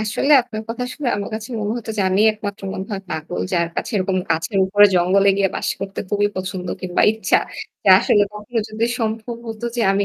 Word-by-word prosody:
আসলে 220 +7 +1
আপনার 220 -2 -7
কথা 245 +2 -3
শুনে 285 -4 -2
আমার 200 - -4
কাছে 220 +2 -6
মনে 210 0 -1
হতো 220 -1 -7
যে - - +3
আমিই 205 +4 +4
একমাত্র 205 -2 -7
মনে 190 - -5
হয় 195 -1 -4
পাগল 160 +2 -4
যার 170 -2 +1
কাছে - - -3
এরকম 190 0 0
গাছের 165 +5 0
উপরে 205 +2 +6
জঙ্গলে 185 +3 +4
গিয়ে 195 -1 +2
বাস - - -2
করতে 195 0 -4
খুবই 205 0 +2
পছন্দ 185 -1 -4
কিংবা 180 -1 0
ইচ্ছা। 220 - +2 0.5
যে - - +2
আসলে 205 - +3
কখনো 210 +3 -4
যদি 215 +1 -1
সম্ভব 225 +1 -3
হত 225 +1 -7
যে 240 - 0
আমি 200 +1 +1
205 Hz, 210 wpm, -20 LUFS, 190-220 Hz, 0.5 s, উপরে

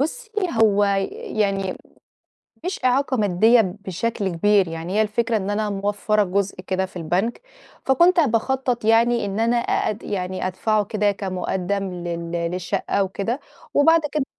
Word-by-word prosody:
بُصي 325 - -3 0.3
هو 205 -2 +4
ي 195 -1 +1 0.4
يعني، 195 -2 0 0.9
مش 365 -5 -4
إعاقة 260 +1 +2
مادية 215 +3 +4
بشكل 200 +1 -2
كبير 190 +2 +2
يعني، 165 +2 -5
هي 215 - +4
الفكرة 230 +2 0
إن 200 -1 -2
أنا 210 0 -1
موفّرة 205 +1 0
جزء 195 +1 -1
كده 190 0 -1
في 185 - -21
البنك، 180 +7 -1 0.4
فكنت 345 +7 +4
باخطّط 255 -2 0
يعني 230 +1 +3
إن 200 +2 -3
أنا 230 +1 +2
أ 235 - 0
أد 215 - -7
يعني 185 -2 -3
أدفعه 210 +3 0
كده 210 -1 0
كمقدَّم 190 0 -3
لل 170 -1 -5 0.2
للشقَّة 185 +3 -1
وكده 200 +7 -3 0.3
وبعد 325 +3 +5
كده 300 -3 0
205 Hz, 145 wpm, -22 LUFS, 190-230 Hz, 0.9 s, وبعد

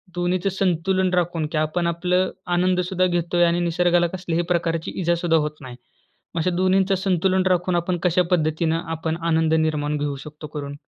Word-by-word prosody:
दोन्हीचं 180 +2 0
संतुलन 185 0 0
राखून 175 -3 0
की 160 - -1
आपण 155 +3 0
आपलं 180 +2 +1 0.3
आनंद 180 +1 +2
सुद्धा 185 -1 +1
घेत 175 -1 -1
आहे 175 - +4
आणि 170 0 +1
निसर्गाला 175 0 +2
कसल्याही 175 -2 -2
प्रकारची 165 -1 -1
इजा 170 0 +2
सुद्धा 170 -1 +1
होत 150 0 -1
नाही. 130 -2 -9 0.6
मग - - 0
अशा 180 - +1
दोन्हींचं 190 +1 +2
संतुलन 190 0 +1
राखून 180 0 +1
आपण 175 +1 0
कशा 180 0 +3
पद्धतीनं 160 -1 +1
आपण 160 0 -3
आनंद 160 -1 +2
निर्माण 150 -2 0
घेऊ 145 -1 -2
शकतो 150 0 -9
करून? 145 -1 -6
175 Hz, 175 wpm, -22 LUFS, 160-180 Hz, 0.6 s, आहे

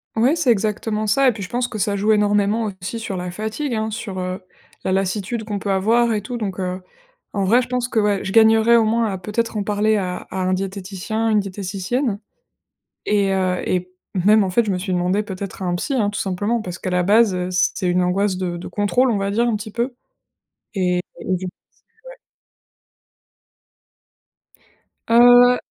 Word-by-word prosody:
Ouais, 245 +8 +3
c'est 320 -7 0
exactement 215 0 -1
ça, 270 +6 +3
et 250 - +6
puis, 205 -3 -7
je 180 - -7
pense 245 0 -1
que 220 - -7
ça 200 0 0
joue 210 +2 +1
énormément 210 +1 +2 0.2
aussi 225 +5 -4
sur 200 -4 -4
la 180 0 -4
fatigue, 220 +8 -3
hein, 220 0 -2
sur, 210 -3 -6
heu, 185 +2 -4 0.4
la - - -1
lassitude 195 +4 -1
qu'on 205 -2 -4
peut 200 - -4
avoir 230 +5 +2
et 210 - -1
tout. 240 +4 -5
Donc, 195 -4 -4
heu, 185 0 -3 0.5
en 200 -2 0
vrai, 235 +7 +4
je - - -6
pense 250 -1 -1
que, 230 -3 0
ouais, 205 -2 +1
je 190 - -4
gagnerais, 225 +1 +5
au 225 - +4
moins, 230 +1 +1
à 190 - -3
peut-être 215 +3 -2
en 205 - -1
parler 210 +1 +1
à 180 -2 -2
à 190 - -5
un 185 0 +1
diététicien, 195 +3 -3
une 215 -1 +3
diététicienne 200 +4 -2 0.9
et 200 -2 +1
heu, 185 -1 0
et 180 0 -1 0.2
même, 205 +4 +4
en - - -1
fait, 235 +6 +2
je 210 - -2
me 185 - 0
suis 185 +1 -3
demandée, 180 +4 +1
peut-être 195 -1 -7
à - - -2
un 175 - 0
psy, 270 +10 -2
hein, 215 -5 +1
tout 205 - -3
simplement 205 +5 -1
parce 180 -2 -6
qu'à - - -5
la 180 0 +1
base, 205 +1 +4
heu, 180 0 -2
c'est 185 +1 0
une 180 +1 +2
angoisse 185 +1 0
de 180 -2 -3
de 170 - -7
contrôle, 240 +5 +1
on 210 - 0
va 195 0 -1
dire, 230 +4 +1
un 225 -3 +1
petit 215 +1 -7
peu 240 +2 -2 0.8
et 180 -2 +1 0.2
du 185 0 -2
coup - - -7 0.6
ouais. - - -12 2.9
Heu. 245 +1 +7
205 Hz, 205 wpm, -21 LUFS, 185-225 Hz, 2.9 s, Heu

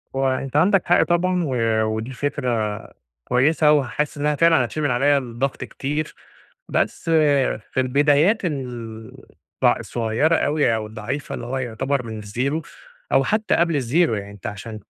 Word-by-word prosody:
هو 135 0 +1
أنت 130 +1 -3
عندك 185 +4 +4
حق 175 - +4
طبعًا، 180 +1 +1
و 135 -4 -2 0.3
ودي 110 +3 -3
فكرة 120 -6 -2 0.5
كويسة 150 +4 +3
وحاسس 150 +1 0
إنها 150 +1 0
فعلًا 165 -5 +4
هتشيل 155 +6 -4
من 140 - +1
عليّا 140 +4 +3
الضغط 130 +1 -3
كتير. 150 +3 -4 0.5
بس 165 - -1 0.6
في - - -12
البدايات 145 - +3
ال 120 -7 -5 0.5
ض - - +5
الصغيرة 120 +8 +1
أوي 145 -7 +2
أو 110 -1 -3
الضعيفة 110 +6 -5
اللي - - -7
هو 130 +2 -3
يعتبر 130 +1 -2
من 110 -2 -7
الzero 130 +9 -2 0.5
أو - - +4
حتى 215 0 +1
قبل 165 -4 +1
الzero 120 +2 -6 0.2
يعني 100 0 -7
أنت 100 -2 -8
عشان 110 +2 -7
135 Hz, 155 wpm, -22 LUFS, 115-150 Hz, 0.6 s, ض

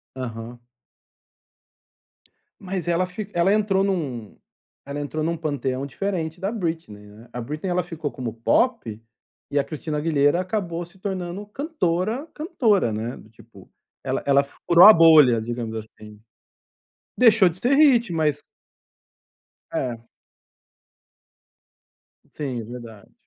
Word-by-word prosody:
Aham. 120 -1 -7 2.0
Mas 185 -2 -4
ela 175 +2 +1
fi 200 +3 -7
ela 175 +3 +3
entrou 205 -2 +2
num 140 - -3 0.5
ela 140 +1 -5
entrou 155 +2 -3
num 165 +1 -1
panteão 140 -4 -3
diferente 170 +1 -4
da 195 +2 -1
Britney, 160 - -5
né, 110 +3 -15
a 125 - -5
Britney 150 +9 -4
ela 180 -1 0
ficou 165 -4 -5
como 120 -4 -5
pop, 115 - 0 0.5
e 145 - +1
a - - +3
Cristina 155 -1 -5
Aguilera 150 +1 +2
acabou 180 -3 -3
se 175 +3 -17
tornando 190 0 -5
cantora, 230 - -2
cantora, 220 - +1
né, 115 +4 -4
tipo, 110 -3 -18 0.3
ela - - -2
ela 140 0 +4
furou 170 +5 +4
a 215 - +12
bolha, 155 - +6
digamos 115 -1 -5
assim. 105 -1 -11 1.0
Deixou 220 -6 +6
de 170 +2 -7
ser 250 +6 +2
hit 245 - +4
mas 155 -3 0 1.3
É. 120 - -3 2.3
Sim, 130 -6 -4
é - - -7
verdade. 115 -3 -11
160 Hz, 125 wpm, -23 LUFS, 125-190 Hz, 2.3 s, a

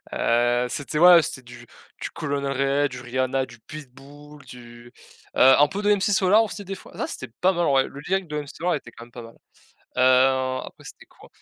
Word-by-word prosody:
Heu, 120 +1 +1
c'était 145 +3 -4
ouais, 175 0 +7
c'était 130 - -6
du 120 0 -13 0.4
du - - -5
Colonel 140 -1 -3
Reyel, 140 +1 0
du 125 -1 -9
Rihanna, 130 +1 -2
du 120 -2 -16
Pitbull, 145 +2 -13
du, 120 -1 -14 0.4
heu, - - -1 0.2
un 145 - +5
peu 200 +6 -5
de 210 0 +1
MC 195 - -3
Solar, 195 +3 +4
aussi 210 -2 -6
des 195 +1 -6
fois, - - -15
ça - - -2
c'était 130 - -8
pas 190 +1 +3
mal 175 -1 -1
en - - +1
vrai, 135 -1 +3
le 140 - -11
lyrique 190 +4 -2
de 150 -1 -4
MC 145 - -14
Solar 175 +2 0
était 120 - -6
quand 115 - -13
même 120 - -21
pas 120 - -9
mal. 115 0 -13 0.6
Heu, 130 0 +3
après - - -13
c'était - - -13
quoi? - - -19
135 Hz, 220 wpm, -23 LUFS, 125-155 Hz, 0.6 s, ouais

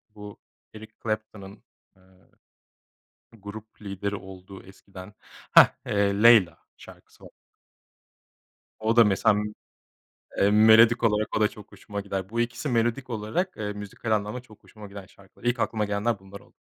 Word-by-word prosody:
bu 105 -1 -11 0.3
Eric 110 0 -12
Clapton'ın, 110 -2 -6 0.3
eee, - - -26 1.4
grup 105 +2 -11
lideri 100 0 -4
olduğu 95 0 -11
eskiden, 95 0 -13 0.4
hah, - - +9 0.2
eee, 100 0 0
"Layla" 115 -7 +6 0.2
şarkısı - - -17
va - - -12 1.5
O 110 +1 +1
da 115 - +8
mesela 105 +1 +2
m 105 0 -4 0.9
eee, 100 - +3
melodik 110 +2 +6
olarak 105 -1 0
o - - -1
da 105 - +5
çok 105 0 -14
hoşuma 100 +1 -7
gider. 95 -1 -5
Bu 115 +2 -1
2'si 120 +5 -3
melodik 120 +2 -1
olarak, 115 - -3
eee, 105 -1 -4
müzikal 105 +2 -7
anlamda 105 +3 -1
çok 110 -4 -20
hoşuma 105 -2 -13
giden 100 -1 -10
şarkılar. 95 +1 -22
İlk 120 0 0
aklıma 110 -2 -1
gelenler 105 +1 -1
bunlar 95 +1 -12
oldu. - - -24
105 Hz, 150 wpm, -25 LUFS, 100-110 Hz, 1.5 s, hah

